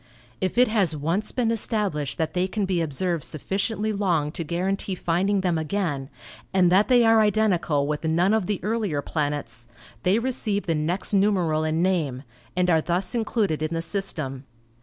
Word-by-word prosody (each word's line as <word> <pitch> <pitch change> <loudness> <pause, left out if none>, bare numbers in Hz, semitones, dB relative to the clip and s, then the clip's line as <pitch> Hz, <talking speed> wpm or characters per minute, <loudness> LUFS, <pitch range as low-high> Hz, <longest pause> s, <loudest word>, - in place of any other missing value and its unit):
If 185 +4 -1
it 250 +1 +6
has 195 -8 +1
once 165 +8 -1
been 235 -3 0
established 205 - -1
that 160 -1 -1
they 180 +1 +1
can 200 +1 -2
be 185 -3 0
observed 165 +2 -1
sufficiently 210 - -2
long 175 -7 0
to 165 - -5
guarantee 185 +4 -2
finding 190 +4 0
them 175 -3 0
again, 155 -5 -2 0.4
and 180 -2 +3
that 195 +3 +4
they 245 -2 +5
are 225 -1 +5
identical 200 -9 +2
with 150 +1 -3
none 170 +5 +2
of 220 -5 +1
the 205 -3 -1
earlier 205 -9 -1
planets, 145 -7 -3 0.3
they 185 - +3
receive 230 -4 -1
the 165 - +1
next 165 +7 0
numeral 185 -6 +2
and 155 +2 0
name, 155 -9 0 0.3
and 180 0 +2
are 165 -3 +4
thus 180 +3 -1
included 215 -8 0
in 155 +1 -2
the 165 - -1
system. 150 -9 -3
180 Hz, 175 wpm, -24 LUFS, 155-205 Hz, 0.4 s, it